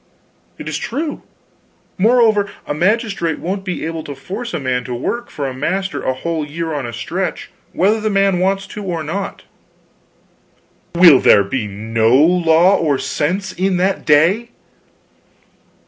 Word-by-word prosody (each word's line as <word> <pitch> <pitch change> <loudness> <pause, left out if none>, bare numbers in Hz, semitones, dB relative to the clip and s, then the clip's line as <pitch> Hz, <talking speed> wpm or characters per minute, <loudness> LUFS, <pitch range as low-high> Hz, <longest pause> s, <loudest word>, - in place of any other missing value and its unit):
"It's - - -4
true. 295 +5 -4 0.8
Moreover, 220 -2 +3 0.2
a - - -3
magistrate 190 -1 0
won't 190 +3 -4
be 180 -4 -4
able 165 -1 -4
to 145 - -7
force 205 - -6
a 170 - -3
man 130 -2 -1
to 125 - -4
work 235 - -3
for 145 - -5
a 130 - -4
master 185 +2 -2
a 130 - -1
whole 160 +3 -3
year 160 +2 -4
on 140 -4 -3
a - - -6
stretch 115 - -4 0.2
whether 210 +5 +1
the 215 - 0
man 195 -2 +2
wants 195 +1 0
to 205 +1 -8
or 170 -4 -3
not." 195 +6 -5 1.5
"Will 170 -6 +8
there 100 - +5
be 105 +3 -3
no 110 +3 +1
law 170 +4 +4
or 150 -4 +1
sense 185 +8 -2
in 185 0 0
that 190 +2 0
day?" 170 +11 +3
175 Hz, 150 wpm, -18 LUFS, 145-195 Hz, 1.5 s, Will